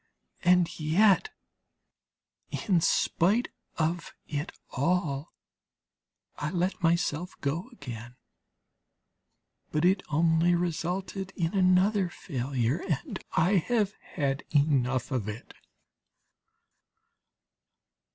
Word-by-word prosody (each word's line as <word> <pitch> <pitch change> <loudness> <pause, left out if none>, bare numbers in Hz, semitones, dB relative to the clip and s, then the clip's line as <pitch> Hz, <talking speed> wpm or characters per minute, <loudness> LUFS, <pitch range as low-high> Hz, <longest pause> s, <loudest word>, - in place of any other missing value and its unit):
And 180 -2 +3
yet, 195 - +4 1.2
in 185 -6 +1
spite 200 +9 +2 0.3
of 165 +2 -1
it 150 +1 -3 0.2
all, 145 0 0 1.1
I 150 - -2
let 180 +3 -1
myself 170 0 0
go 160 - -2
again, 125 - -8 1.6
but 155 +2 +1
it 185 +1 +4
only 165 +3 +3
resulted 180 +3 -2
in 165 0 -1
another 190 +1 +3
failure, 130 -2 -2
and 150 -5 -3
I 180 +5 +3
have 210 +2 +1 0.2
had 140 -3 0
enough 135 -4 +2
of 115 -5 -1
it. 105 +2 -8
170 Hz, 85 wpm, -28 LUFS, 145-185 Hz, 1.6 s, yet